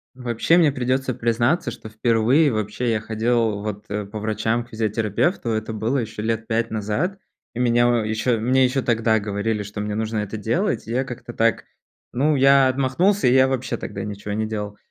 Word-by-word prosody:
Вообще 125 +6 +1
мне 160 -4 +5
придется 130 0 -1
признаться, 120 +6 +1
что 115 -2 -10
впервые 120 +6 +3
вообще 110 +3 -2
я 110 - +1
ходил 110 -1 0
вот, 105 0 -5
э, 105 0 -3
по 105 +2 -7
врачам 110 +2 -1
к 120 - -20
физиотерапевту. 110 - -1
Это 110 0 -2
было 110 +5 -1
еще 110 -4 -4
лет 115 0 -2
5 115 0 0
назад. 110 - -2 0.4
И 120 - -4
меня 120 -1 +3
еще, 110 +2 0
мне 130 +4 +3
еще 130 +1 +1
тогда 115 -1 +2
говорили, 105 +1 -2
что 105 +1 -6
мне 105 0 -3
нужно 110 0 -2
это 105 +1 -4
делать. 115 - -1
И - - -5
я 130 +3 +1
как-то 120 -2 -8
так, 115 -2 +1 0.5
ну, 145 +5 +2
я 135 0 +5
отмахнулся, 140 +10 +1
и 125 - +4
я 130 0 +5
вообще 130 -2 -2
тогда - - -6
ничего 105 -1 -5
не 110 +1 -1
делал. 105 -1 -5
115 Hz, 190 wpm, -22 LUFS, 110-130 Hz, 0.5 s, мне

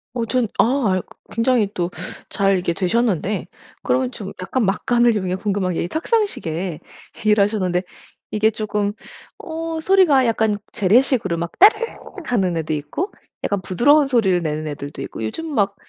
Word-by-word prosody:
어 235 -2 -1
저는 245 0 0
아 225 -7 +3
그 - - -20
굉장히 230 -2 +2
또 175 -1 -1 0.4
잘 195 -1 +2
이렇게 180 -2 0
되셨는데 200 +1 0 0.3
그러면 255 -1 0
좀 205 -5 -7
약간 235 +7 -1
막간을 235 +4 +2
이용해 185 -3 -1
궁금한 195 -2 -1
게 - - -1
이 - - -3
탁상시계 190 - -1 0.4
얘기를 210 -1 +3
하셨는데 185 -4 0 0.5
이게 215 +1 +2
쪼금 210 -1 -2 0.5
어 325 0 -4
소리가 315 -8 +4
약간 220 -2 +1
재래식으로 220 -3 +2
막 170 0 -3
따르릉 435 +4 +5 0.3
하는 190 -8 +1
애도 155 -1 -2
있고 155 - -3 0.3
약간 200 - 0
부드러운 280 - +4
소리를 205 -9 +2
내는 155 0 -2
애들도 145 -1 -6
있고 - - -7
요즘 325 - -4
막 200 -3 +1
210 Hz, 335 characters per minute, -21 LUFS, 185-255 Hz, 0.5 s, 따르릉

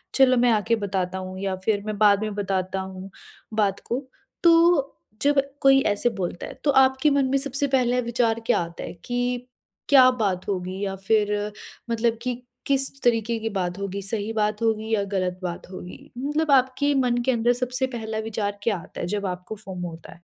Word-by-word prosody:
चलो 255 -2 +5
मैं 245 0 +4
आके 220 +1 +2
बताता 190 -3 -2
हूँ 185 0 -6
या 195 -1 -1
फ़िर 205 -2 +1
मैं 215 -1 -3
बाद 205 -1 +5
में 215 -1 -2
बताता 190 -1 -1
हूँ, 190 0 -7 0.4
बात 205 -2 +1
को। 240 - -1 0.4
तो 335 -4 +5 0.3
जब 285 0 +4 0.2
कोई 270 0 +6
ऐसे 205 +3 +2
बोलता 180 -2 -4
है - - -8
तो 290 - +3
आपके 265 +1 +4
मन 280 -1 +2
में 275 - +2
सबसे 280 +1 0
पहला 250 -2 +2
विचार 235 -1 0
क्या 245 - +3
आता 170 0 -5
है - - -6
कि 245 0 -2 0.4
क्या 260 -3 +8
बात 200 -7 -1
होगी 185 -1 -3
या 195 -1 -2
फ़िर 210 +1 0 0.4
मतलब 230 0 +1
कि 250 0 -3 0.3
किस 275 0 +1
तरीक़े 230 -1 +2
की 225 0 -2
बात 185 -3 -2
होगी, 200 0 -4
सही 205 +2 -2
बात 210 -1 0
होगी 220 -1 0
या 205 -2 +2
ग़लत 185 -1 -1
बात 175 0 -5
होगी? 180 -1 -10
मतलब 295 +4 0
आपके 265 +2 +3
मन 250 -3 +2
के 260 - +3
अंदर 240 0 +2
सबसे 250 +1 -1
पहला 225 -3 -5
विचार 205 -2 -3
क्या 210 -3 +1
आता 170 - -11
है - - -2
जब 205 +2 -2
आपको 180 +3 -5
फ़ोमो 185 -4 -6
होता 165 0 -11
है? 170 - -21
220 Hz, 195 wpm, -24 LUFS, 195-255 Hz, 0.4 s, क्या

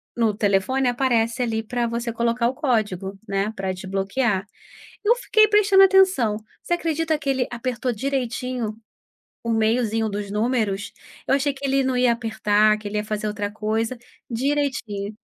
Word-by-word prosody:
no 230 -3 +2
telefone, 215 +6 +1
aparece, 240 -1 +1
ali, 225 -1 -1
pra 240 +1 -1
você 235 0 -3
colocar 235 +1 +1
o 250 - -1
código, 205 - -1
né, 195 +1 -1
pra 190 -1 -2
desbloquear. 195 +3 -1 0.6
Eu 460 - +5
fiquei 435 -3 +4
prestando 405 -2 +6
atenção. 375 - +4 0.3
Você 345 - 0
acredita 325 -2 -1
que 285 -2 -2
ele 260 -1 +1
apertou 245 0 -2
direitinho 250 -2 -2 0.7
o 230 - -3
meiozinho 225 0 +1
dos 200 -1 -4
números? 210 -3 -1 0.3
Eu 270 - +4
achei 280 +1 0
que 275 +1 -7
ele 270 0 +2
não 260 -1 0
ia 250 -1 +4
apertar, 215 -2 +2
que 210 - -7
ele 210 - -3
ia 210 - 0
fazer 215 0 -3
outra 205 -1 -3
coisa. 220 +3 -2 0.3
Direitinho. 235 -6 -2
235 Hz, 155 wpm, -23 LUFS, 210-265 Hz, 0.7 s, prestando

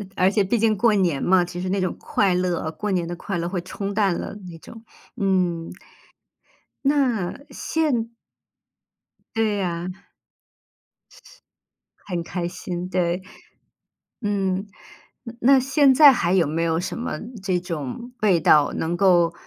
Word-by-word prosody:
而 185 +1 +3
且 205 0 +2
毕 200 +5 0
竟 220 0 +2
过 220 +1 +3
年 175 -8 +1
嘛， 180 -1 +3
其 175 0 -7
实 185 - -3
那 195 - 0
种 185 -1 -1
快 195 -3 +1
乐， 180 -3 -1
过 210 +4 -4
年 175 -3 0
的 175 - -4
快 185 +1 -4
乐 170 - -2
会 180 0 -3
冲 195 +2 -5
淡 200 -4 +2
了 - - -5 0.2
那 165 - -10
种。 225 +7 -13 0.3
嗯。 180 -5 0 1.2
那 265 -9 +1
现 275 -8 -1 1.3
对 220 -2 +1
呀。 175 -2 -2 2.2
很 175 -3 -3
开 175 0 -4
心， 180 0 -5
对。 180 -1 0 1.0
嗯。 195 -2 -1 0.7
那 270 +2 +6
现 270 +2 +4
在 290 -1 +9
还 180 -7 0
有 180 -4 +4
没 160 +3 -2
有 165 -1 +1
什 180 - -4
么 240 - -3 0.3
这 185 -2 0
种 175 - -6
味 195 -5 +4
道， 150 -2 +4
能 165 +2 -1
够 175 -3 +4
185 Hz, 150 characters per minute, -23 LUFS, 175-215 Hz, 2.2 s, 在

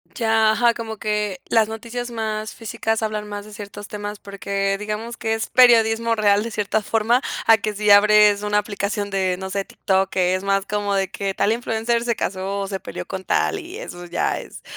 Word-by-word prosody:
Ya, 225 -2 +3
ajá, 235 +2 +3
como 225 -1 -6
que 210 -3 -2
las 225 -2 +4
noticias 235 +2 -5
más 220 -2 -4
físicas 225 0 -2
hablan 215 -1 -3
más 205 0 -6
de 215 - -12
ciertos 205 0 -9
temas 205 0 -6
porque 200 0 -2
digamos 215 +3 -5
que 225 -1 -1
es 225 - -4
periodismo 230 -2 +5
real 205 -2 +3
de 230 - -4
cierta 215 0 0
forma, 225 +4 +1 0.2
a 225 -1 +7
que 215 0 -3
si 210 0 +2
abres 210 0 +6
una 210 0 0
aplicación 205 0 -2
de, 190 -2 0
no 190 +1 -6
sé, 195 0 -2
TikTok, 190 0 0
que 185 -1 +1
es 185 - -4
más 195 0 +1
como 205 -1 -1
de 195 -1 0
que 195 -1 -3
tal 205 - +2
influencer 230 0 0
se 235 -1 0
casó 195 +1 -3
o 195 - -3
se 195 -1 -4
peleó - - -7
con 190 -1 -6
tal, 400 - +1
y 360 +2 -9
eso 175 - -8
ya 170 - -1
es. - - -11
210 Hz, 205 wpm, -22 LUFS, 200-225 Hz, 0.2 s, a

